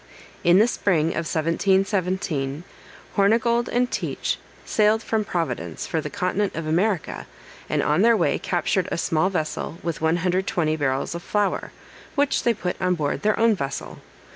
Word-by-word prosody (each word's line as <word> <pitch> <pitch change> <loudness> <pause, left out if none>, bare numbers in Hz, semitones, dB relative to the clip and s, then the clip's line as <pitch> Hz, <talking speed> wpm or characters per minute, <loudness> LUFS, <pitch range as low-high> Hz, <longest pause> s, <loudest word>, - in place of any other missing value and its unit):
In 175 +1 +6
the 215 +4 +6
spring 170 -9 +1
of 165 -1 -3
1717, 175 -3 0 0.5
Hornigold 235 +4 +3
and 245 +1 +1
Teach - - -2 0.3
sailed 215 +1 +2
from 220 -1 0
Providence 125 - -3
for 160 - -1
the 150 - -5
continent 185 +6 -1
of 165 - -3
America, 175 +3 0 0.4
and - - +1
on 150 +5 +2
their 230 +1 +5
way - - +1
captured 180 +1 0
a - - -1
small 165 +2 +1
vessel 160 -2 -3
with 170 -2 -3
120 175 -1 +1
barrels 135 -2 -1
of 170 - -5
flour, 205 +1 -1 0.4
which 285 -1 +2
they 235 - +2
put 180 -3 -4
on 180 -1 +2
board 150 -4 -2
their 210 0 +1
own 230 0 +5
vessel. 140 -7 -5
180 Hz, 155 wpm, -24 LUFS, 160-210 Hz, 0.5 s, In